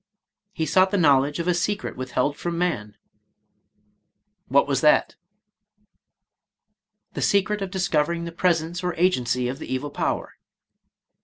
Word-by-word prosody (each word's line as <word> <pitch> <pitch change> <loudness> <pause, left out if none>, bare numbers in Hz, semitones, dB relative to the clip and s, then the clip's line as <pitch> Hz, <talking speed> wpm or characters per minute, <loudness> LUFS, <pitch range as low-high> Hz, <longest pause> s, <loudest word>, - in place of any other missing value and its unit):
— - - -66
"He 160 - -2
sought 185 +5 +3
the 200 - 0
knowledge 145 -3 +3
of 170 0 -3
a 180 - +3
secret 200 +4 -2
withheld 130 +3 -1
from 170 +2 -4
man." 115 -13 -2 1.5
"What 140 +3 +3
was 140 -1 0
that?" 150 -1 +3 1.0
— - - -55
"The - - -4
secret 200 +1 +1
of 195 - -3
discovering 170 -3 0
the 170 - -6
pres 170 -1 +2
ence 175 +3 -6
or 180 -1 -2
agency 125 -9 +1
of 130 +3 -5
the - - -8
evil 135 +3 -3
power." - - -3
165 Hz, 150 wpm, -24 LUFS, 140-180 Hz, 1.5 s, sought